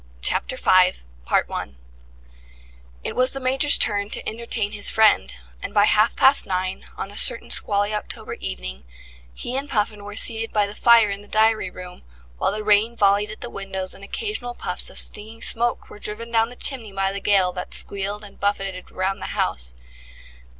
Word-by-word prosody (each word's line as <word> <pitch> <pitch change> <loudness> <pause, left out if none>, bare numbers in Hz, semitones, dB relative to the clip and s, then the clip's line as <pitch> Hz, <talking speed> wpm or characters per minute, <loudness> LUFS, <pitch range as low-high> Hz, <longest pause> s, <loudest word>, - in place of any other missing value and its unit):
CHAPTER - - 0
FIVE 185 - +4 2.0
It - - -4
was 255 +1 +2
the 270 - -4
Major's 270 +3 +4
turn 205 -1 +1
to - - 0
entertain 225 -2 0
his 205 -1 +4
friend, 215 - +4 0.3
and - - -6
by 205 0 +6
half 215 +2 +3
past 270 +1 +5
nine, 185 0 -3
on 195 - -5
a 205 - -10
certain - - +1
squally 205 +1 0
October 210 - -4
evening, 60 0 -6 0.5
he 240 - -5
and 280 +2 -3
Puffin 210 -1 -1
were 205 0 -8
seated 225 +1 +4
by 210 -1 +2
the 200 - -7
fire 230 -1 +5
in 200 0 -4
the 205 - -15
diary 220 -2 +2
room, 180 0 -11 0.4
while - - +1
the 215 +1 -3
rain 210 +3 +3
volleyed 205 +1 +3
at 215 - -9
the 240 - -5
windows 190 -1 -5
and 195 - -13
occasional 245 - -4
puffs 180 - -2
of - - -10
stinging 220 +2 -3
smoke 235 +1 0
were - - -13
driven 230 +3 -7
down 225 0 +2
the 245 - -10
chimney 245 -5 -4
by 195 0 0
the 200 0 -5
gale 195 -3 +3
that 180 0 -6
squealed 200 +1 -3
and 205 - -13
buffeted 195 -2 -2
round 190 +1 -2
the - - -4
house. - - -1
205 Hz, 180 wpm, -22 LUFS, 195-225 Hz, 2.0 s, by